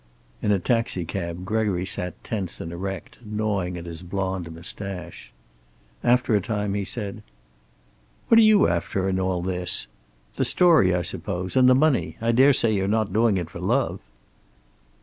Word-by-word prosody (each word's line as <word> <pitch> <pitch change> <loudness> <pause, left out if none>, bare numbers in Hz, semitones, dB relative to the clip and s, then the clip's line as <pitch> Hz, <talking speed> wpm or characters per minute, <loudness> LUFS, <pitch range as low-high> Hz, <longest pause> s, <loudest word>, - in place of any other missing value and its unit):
In 105 - +1
a 100 - +4
taxicab 90 -4 -2
Gregory 100 -3 0
sat 90 -1 -1
tense 100 -8 -4
and 85 - -6
erect, 95 +2 -6
gnawing 105 -4 -2
at 85 - -8
his 85 -1 -6
blond 95 -1 -3
mustache. 90 +1 -5 0.7
After 125 -2 +3
a 100 - +2
time 105 0 -2
he 100 0 -1
said: 105 +1 -5 1.1
"What 230 - +6
are - - +8
you 215 -2 +5
after, 90 +3 -1
in 95 -1 0
all 95 -2 -1
this? 90 -1 -2 0.5
The - - +1
story, 160 - +5
I 90 - -1
suppose. 90 +1 -3
And 130 -1 +6
the 130 - +6
money. 145 -1 +1
I 115 +1 +1
daresay 125 -2 +4
you're 95 -1 0
not 110 0 0
doing 110 -2 +3
it 85 -2 -4
for - - -8
love." - - 0
100 Hz, 160 wpm, -24 LUFS, 90-110 Hz, 1.1 s, are